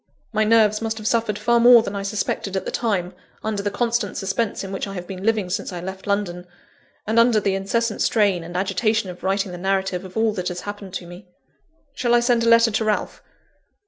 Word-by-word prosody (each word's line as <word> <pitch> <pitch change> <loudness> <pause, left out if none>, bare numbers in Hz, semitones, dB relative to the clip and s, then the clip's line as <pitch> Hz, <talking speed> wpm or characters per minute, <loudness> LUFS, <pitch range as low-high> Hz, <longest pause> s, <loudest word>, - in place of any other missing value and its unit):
My 215 0 +2
nerves 215 -1 +4
must 225 0 -2
have 215 - -8
suffered 225 -3 +1
far 235 +3 +2
more 240 -1 +8
than 200 - -5
I 200 - -2
suspected 195 -1 -2
at 190 - -3
the - - -3
time, 195 -6 -1 0.3
under 215 -2 -2
the 205 - -1
constant 235 -2 -1
suspense 200 +3 -2
in 195 - -6
which 195 - -3
I 195 - -7
have 180 -1 -5
been 185 0 -8
living 215 -4 0
since 200 - -2
I 180 - -5
left 190 +2 -7
London, 180 -3 -2 0.6
and 220 +2 +2
under 230 -2 +5
the 200 -1 0
incessant 215 +3 -1
strain 200 -6 +2
and 175 +2 -6
agitation 195 +2 0
of 180 - -13
writing 195 0 -1
the 175 - -7
narrative 190 -1 -1
of 190 +2 -9
all 220 -1 +2
that 180 -3 -3
has 180 -1 -4
happened 205 -2 -7
to 175 - -5
me. 175 +2 -12 0.7
Shall 240 -3 +1
I - - +5
send 240 -1 +2
a 230 - +3
letter 230 0 +6
to 220 +2 0
Ralph? 215 -1 -1
205 Hz, 225 wpm, -22 LUFS, 190-225 Hz, 0.7 s, more